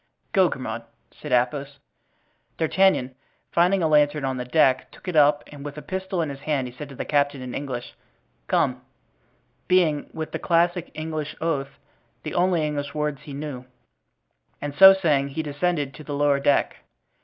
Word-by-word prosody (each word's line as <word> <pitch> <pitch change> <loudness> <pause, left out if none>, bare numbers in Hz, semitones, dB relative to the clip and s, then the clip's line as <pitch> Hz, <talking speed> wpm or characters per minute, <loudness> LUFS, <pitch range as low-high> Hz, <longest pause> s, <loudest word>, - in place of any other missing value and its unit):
"Go, 190 -4 +5
Grimaud," 130 -4 -5 0.3
said 150 - -9
Athos. 135 +3 0 0.8
D'Artagnan, 165 -5 +2 0.4
finding 180 +2 +3
a - - +3
lantern 150 -1 +3
on 130 -1 -2
the 125 - -4
deck, 130 -1 +2
took - - -17
it 180 - -3
up 150 0 +5
and 145 -1 -10
with 145 0 -7
a 150 - -7
pistol 190 -2 -2
in 155 - -3
his 140 -1 -7
hand 140 -2 -1
he 125 - -10
said 145 +3 -8
to 135 - -10
the - - -5
captain, 145 -1 +1
in 125 -1 -7
English, 130 -4 -5 0.5
"Come," - - +1 0.9
(being, 170 -5 +2
with 160 -1 -5
the - - -4
classic 175 0 +1
English 155 -1 -4
oath, 140 -4 -2 0.5
the - - -5
only 175 -3 +2
English 145 -1 -4
words 150 -2 -2
he 145 - -10
knew), 140 -3 -6 0.9
and 145 -1 -4
so 190 +6 +10
saying 150 -7 +1
he 150 +3 -4
descended 145 -1 -1
to 155 - -11
the 145 0 -5
lower 145 -1 +2
deck. 140 0 +2
150 Hz, 175 wpm, -24 LUFS, 140-165 Hz, 0.9 s, so